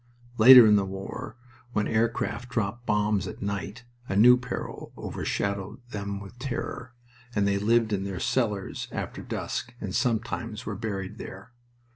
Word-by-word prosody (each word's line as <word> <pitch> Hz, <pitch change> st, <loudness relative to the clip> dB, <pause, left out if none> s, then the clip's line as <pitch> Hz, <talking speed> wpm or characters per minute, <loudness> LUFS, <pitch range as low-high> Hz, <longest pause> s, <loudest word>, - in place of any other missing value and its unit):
Later 125 Hz, +1 st, +11 dB
in 105 Hz, -1 st, +6 dB
the 100 Hz, -, +2 dB
war, 95 Hz, +4 st, -6 dB, 0.4 s
when 105 Hz, -, +1 dB
aircraft 115 Hz, +2 st, -1 dB
dropped 120 Hz, 0 st, -2 dB
bombs 105 Hz, -2 st, +1 dB
at -, -, -8 dB
night, 100 Hz, +3 st, -4 dB, 0.3 s
a 95 Hz, -, -1 dB
new 120 Hz, +5 st, +8 dB
peril 125 Hz, 0 st, -6 dB
over -, -, -5 dB
shadowed 100 Hz, +3 st, -2 dB
them 100 Hz, -1 st, -4 dB
with 100 Hz, +5 st, -12 dB
terror, 125 Hz, -1 st, -5 dB, 0.4 s
and 100 Hz, -1 st, +2 dB
they 100 Hz, 0 st, +1 dB
lived 110 Hz, +1 st, +2 dB
in 95 Hz, -1 st, 0 dB
their 95 Hz, -3 st, -4 dB
cellars 105 Hz, -5 st, -1 dB
after -, -, -5 dB
dusk, 120 Hz, -, -4 dB
and 100 Hz, -3 st, -5 dB
sometimes 115 Hz, -2 st, -1 dB
were 105 Hz, -, -3 dB
buried 95 Hz, -2 st, -5 dB
there. 100 Hz, +6 st, -9 dB
105 Hz, 155 wpm, -27 LUFS, 100-120 Hz, 0.4 s, Later